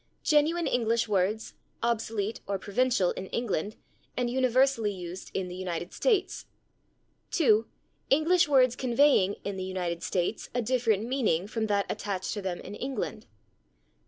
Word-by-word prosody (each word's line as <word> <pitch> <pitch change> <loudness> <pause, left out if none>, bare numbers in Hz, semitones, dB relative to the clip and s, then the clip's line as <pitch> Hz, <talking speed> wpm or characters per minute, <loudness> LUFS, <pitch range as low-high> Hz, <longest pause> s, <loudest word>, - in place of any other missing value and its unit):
Genuine 315 +3 +3
English 230 -1 +1
words, 205 +2 0 0.3
obsolete 225 -2 -1
or 200 0 -1
provincial 210 -1 +1
in 190 - -6
England, 210 -3 -2 0.4
and 245 -1 0
universally 255 -3 +2
used 180 -1 -7
in 190 -1 -1
the 180 - -7
United 180 -1 -4
States. 420 -6 0 0.8
2. 225 - +3 0.4
English 325 +5 +4
words 255 -4 +4
conveying, 245 -6 +3
in 200 -1 -4
the 185 - -3
United 180 -2 -3
States, 180 +4 -2
a 245 - +2
different 230 -4 +1
meaning 230 -9 +1
from 220 +1 -2
that 200 -1 +1
attached 190 -2 -3
to 210 - -4
them 185 -2 -3
in - - -9
England. 260 +5 -4
220 Hz, 140 wpm, -28 LUFS, 190-255 Hz, 0.8 s, English